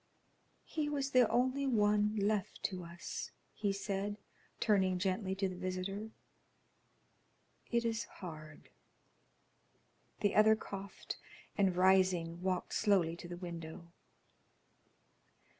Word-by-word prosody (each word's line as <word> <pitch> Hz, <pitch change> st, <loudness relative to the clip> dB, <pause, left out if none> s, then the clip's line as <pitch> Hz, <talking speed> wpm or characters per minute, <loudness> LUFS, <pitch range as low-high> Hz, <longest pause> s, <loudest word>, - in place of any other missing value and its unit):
"He 305 Hz, -2 st, -2 dB
was 280 Hz, -2 st, -1 dB
the 250 Hz, -2 st, +5 dB
only 260 Hz, +3 st, +2 dB
one 210 Hz, -3 st, +3 dB
left 205 Hz, -1 st, 0 dB
to 185 Hz, -2 st, -2 dB
us," 170 Hz, 0 st, -6 dB, 0.2 s
he 205 Hz, -2 st, 0 dB
said, 200 Hz, +1 st, -2 dB, 0.4 s
turning 190 Hz, -4 st, +3 dB
gently 190 Hz, +1 st, 0 dB
to 195 Hz, 0 st, 0 dB
the 185 Hz, -, -5 dB
visitor. 185 Hz, +3 st, -3 dB, 1.6 s
"It 235 Hz, -1 st, +1 dB
is 230 Hz, 0 st, 0 dB
hard." 155 Hz, -4 st, -10 dB, 1.5 s
The 205 Hz, -, +2 dB
other 220 Hz, +1 st, +6 dB
coughed, 200 Hz, -2 st, -7 dB, 0.4 s
and 195 Hz, -3 st, +3 dB
rising, 185 Hz, -2 st, +3 dB
walked 185 Hz, -1 st, -1 dB
slowly 190 Hz, -6 st, +3 dB
to 175 Hz, -, -8 dB
the 175 Hz, 0 st, -6 dB
window. 170 Hz, -1 st, -7 dB
195 Hz, 110 wpm, -35 LUFS, 180-215 Hz, 1.6 s, other